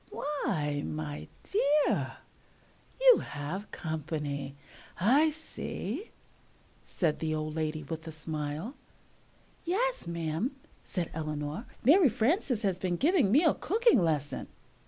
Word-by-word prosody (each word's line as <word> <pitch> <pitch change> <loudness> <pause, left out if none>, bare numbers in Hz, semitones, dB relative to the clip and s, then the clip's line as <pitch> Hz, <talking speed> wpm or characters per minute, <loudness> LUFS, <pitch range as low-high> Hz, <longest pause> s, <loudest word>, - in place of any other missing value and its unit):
"Why, 155 - -1
my 75 -1 -4 0.2
dear, 300 -7 +2 0.9
you - - +8
have 155 +8 -5
company, 150 -3 -4 0.4
I 270 - +5
see," 315 - -5 0.8
said 160 -5 0
the 155 -1 0
old 155 0 -3
lady 155 -1 -2
with 160 +3 -6
a - - -4
smile. 155 - -4 0.9
"Yes, 470 - 0
ma'am," 170 - -2 0.3
said 175 -3 -3
Eleanor, 155 +5 -4 0.2
"Mary 305 - +7
Frances 245 - +1
has 190 -3 +1
been 180 -2 0
giving 290 - +3
me 290 +9 +6
a 320 - +5
cooking 450 - +3
lesson." 150 -4 -1
170 Hz, 115 wpm, -30 LUFS, -, 0.9 s, you